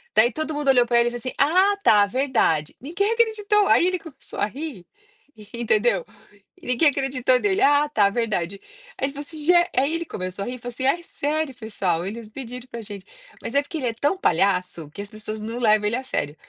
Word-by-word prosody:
Daí 235 +3 +5
todo 310 +2 -3
mundo 295 -1 -3
olhou 245 -2 +5
para 235 0 +3
ele 235 - +3
e - - -10
falou 240 - -5
assim: 255 +2 -4
"Ah 370 +8 +4
tá, 205 -1 +6
verdade". 240 - 0
Ninguém 395 - -1
acreditou, 425 -3 +2
aí 350 - +4
ele 365 -1 0
começou 295 -5 -11
a - - +3
ri 270 - -7 0.7
entendeu, 220 -4 +1 0.6
ninguém 250 +5 +3
acreditou 260 -2 +1
nele, 400 -1 0
ah 290 -2 +4
tá, 205 -8 +3
verdade. 200 -4 -2 0.4
Aí 270 - 0
ele 280 - -7
falo 285 - -6
assim: 305 -1 -8
"ge". 355 - +5 0.2
Aí 280 +5 +2
ele 335 - -2
começou 185 -3 -5
a - - -6
rir 250 - -4
e - - -9
falou 245 0 -7
assim: 260 - -3
"É 335 +6 +2
sério 300 -3 -2
pessoal, 185 -7 -2
eles 220 +2 -6
pediram 250 +1 -8
para 235 -2 -7
gente", 205 -2 -10 0.4
mas 250 - -6
é 280 - +5
porque 315 +3 -7
ele 255 -4 -2
é 230 - -1
tão 290 +11 0
palhaço 180 - 0
que 200 - -7
as 205 - -8
pessoas 215 0 -7
não 230 +3 -5
levam 215 -2 +3
ele 225 - 0
a 265 - -5
sério. 150 - -3
250 Hz, 220 wpm, -23 LUFS, 215-295 Hz, 0.7 s, tá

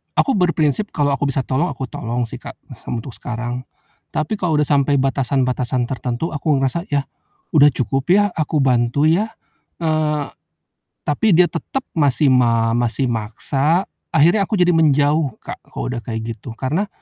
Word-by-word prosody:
aku 275 - +3
berprinsip 175 +2 +1
kalau 145 -1 +2
aku 140 +1 -1
bisa 135 -1 -1
tolong, 145 +7 0
aku 135 -1 -4
tolong 120 +1 -2
sih, - - -8
Kak, - - -9 0.2
sem - - -5
untuk 120 +3 -6
sekarang. 120 +1 -5 0.4
Tapi 160 +7 -2
kalau 170 -4 +1
udah 150 - +3
sampai 140 -1 +2
batasan-batasan 130 -2 0
tertentu 130 +4 -3
aku 150 0 +1
ngerasa, 135 +7 -1
"Yah, 140 -1 0 0.5
udah 145 0 +7
cukup 135 +5 -2
ya 205 +1 +4
aku 155 -1 -1
bantu 125 +3 +2
ya," 205 +7 +1 0.5
eee, 155 -2 0 0.8
tapi 190 +8 +2
dia 175 +2 +6
tetep 270 +10 -3 0.2
masih 145 -1 +3
ma 115 -2 +3
masih 120 +3 0
maksa, 135 - 0 0.3
akhirnya 175 +8 +4
aku 210 - -1
jadi 180 0 +4
menjauh, 150 -1 +2
Kak, - - -8
kalau - - -5
udah 120 - -3
kayak 115 0 -4
gitu. 115 +2 -9
Karena 160 +11 -1
140 Hz, 160 wpm, -20 LUFS, 125-160 Hz, 0.8 s, udah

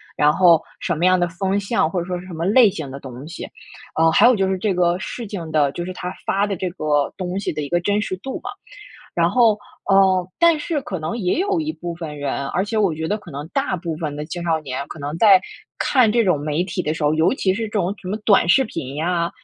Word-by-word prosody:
然 150 0 +4
后 170 -2 +5 0.2
什 170 - -1
么 170 +4 0
样 185 0 +4
的 175 - +2
风 190 +3 -1
向， 200 -4 +1
或 180 - -2
者 170 - -3
说 180 -1 -3
是 180 - -11
什 175 - -9
么 165 +1 -3
类 220 +3 +6
型 155 -7 -6
的 140 - -7
东 130 +2 -9
西。 170 - -7 0.5
嗯， 165 0 +5
还 210 - +5
有 250 - +5
就 195 -1 +1
是 190 - 0
这 195 +1 0
个 175 0 +2
事 230 +3 -6
情 170 -6 -6
的， 145 -3 +2
就 175 - -4
是 185 - -5
他 180 0 -5
发 200 +1 +1
的 200 - -2
这 185 +2 -3
个 150 -4 0
东 185 0 -3
西 200 - -2
的 150 - -3
一 140 - -6
个 175 - +2
真 205 +2 +1
实 185 - -3
度 265 +7 -6
嘛。 - - -6 0.7
然 170 0 +2
后， 230 -1 +4 0.4
嗯， 190 -2 +4
但 335 -2 +5
是 300 -1 -2
可 185 -7 -5
能 160 +8 -4
也 185 - 0
有 390 -3 0
一 315 0 -2
部 175 - -6
分 160 -3 -7
人， 140 -1 -2
而 190 - 0
且 215 +2 -4
我 195 -7 +2
觉 160 +1 -4
得 210 - 0
可 175 - -13
能 145 +2 -6
大 270 -5 -1
部 165 -2 -4
分 150 -3 -4
的 150 - -4
青 175 +1 -5
少 165 -2 +1
年， 140 -1 -5
可 - - -9
能 145 +3 -4
在 195 -3 +7 0.4
看 250 -6 +3
这 235 -2 +3
种 180 -6 +2
媒 150 +3 -1
体 180 0 -3
的 150 - -1
时 160 - -6
候， 150 - +3
尤 160 +7 +3
其 190 -7 +1
是 225 - -3
这 215 - -6
种 200 -2 -1
什 185 - -8
么 205 - -1
短 195 -5 +4
视 265 +9 +5
频 140 - -6
呀， 170 +1 0
180 Hz, 290 characters per minute, -21 LUFS, 160-200 Hz, 0.7 s, 在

